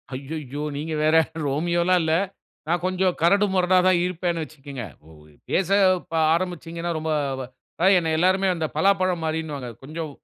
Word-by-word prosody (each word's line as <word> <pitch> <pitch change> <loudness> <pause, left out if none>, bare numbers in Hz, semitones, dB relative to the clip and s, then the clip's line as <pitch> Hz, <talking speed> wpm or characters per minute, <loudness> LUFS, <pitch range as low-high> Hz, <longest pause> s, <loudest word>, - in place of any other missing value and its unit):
ஐய்யய்யோ! 145 +1 -6 0.2
நீங்க 155 +2 -4
வேற 155 +1 +3 0.3
ரோமியோலா 170 +5 +1
இல்ல 160 -1 +1 0.5
நான் 170 +1 0
கொஞ்சம் 185 -1 +1
கரடு 200 +5 +4
முரடா 185 0 +3
தா 185 - +6
இருப்பேன்னு 175 -1 -2
வச்சுக்கங்க. 140 -5 -8 0.7
பேச 190 -1 +1 0.4
ப - - -8 0.2
ஆரம்பிச்சீங்கன்னா 170 -1 -3
ரொம்ப 160 0 -2 0.7
அதா 180 - +3
என்ன 165 -2 0
எல்லோருமே 190 +3 +3
அந்த 160 -2 -2
பலாப்பழம் 185 0 +2
மாரின்னுவாங்க 155 -5 -3
கொஞ்சம் 155 +2 -5
165 Hz, 135 wpm, -24 LUFS, 155-180 Hz, 0.7 s, தா